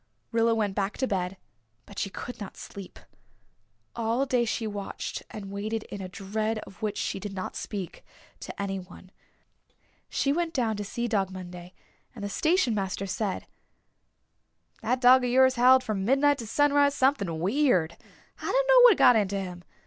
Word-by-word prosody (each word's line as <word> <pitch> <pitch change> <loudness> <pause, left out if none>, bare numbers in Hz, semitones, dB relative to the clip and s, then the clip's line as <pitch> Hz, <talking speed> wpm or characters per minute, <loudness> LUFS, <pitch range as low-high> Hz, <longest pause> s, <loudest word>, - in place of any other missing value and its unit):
Rilla 230 0 +3
went 210 -3 0
back 200 +1 -2
to 260 - 0
bed 190 -2 -2 0.5
but 200 - -9
she 195 - -1
could 245 +5 -8
not 200 - -8
sleep. 195 -2 -10 1.0
All 230 +3 0
day 250 -3 +1
she 225 0 -2
watched 205 -2 -5
and 200 -2 -8
waited 215 +2 -3
in 200 - -5
a 185 - -6
dread 215 +4 -2
of 195 - -15
which 210 -1 -2
she - - -2
did 205 0 -6
not 185 - -5
speak 195 -5 -6 0.4
to - - -9
anyone. 190 -2 -6 1.0
She 275 - +1
went 335 +1 -2
down 230 -5 +1
to 205 - -3
see 235 +4 -3
Dog 200 -4 0
Monday 180 -1 -9 0.4
and 210 - -8
the 205 - -3
station 315 - +2
master 195 -1 -2
said, 195 0 -3 1.4
"That 250 +3 0
dog 255 +1 +7
of 245 - 0
yours 260 +1 +5
howled 255 +1 +5
from 215 -5 -2
midnight 275 +5 +3
to 230 - -6
sunrise 285 +3 +3
something 205 - +1
weird. 185 - +2 0.4
I - - -8
dunno - - +5
what 460 -7 +7
got 245 - +7
into 200 -2 +1
him. 180 -2 -7
215 Hz, 170 wpm, -27 LUFS, 195-255 Hz, 1.4 s, dog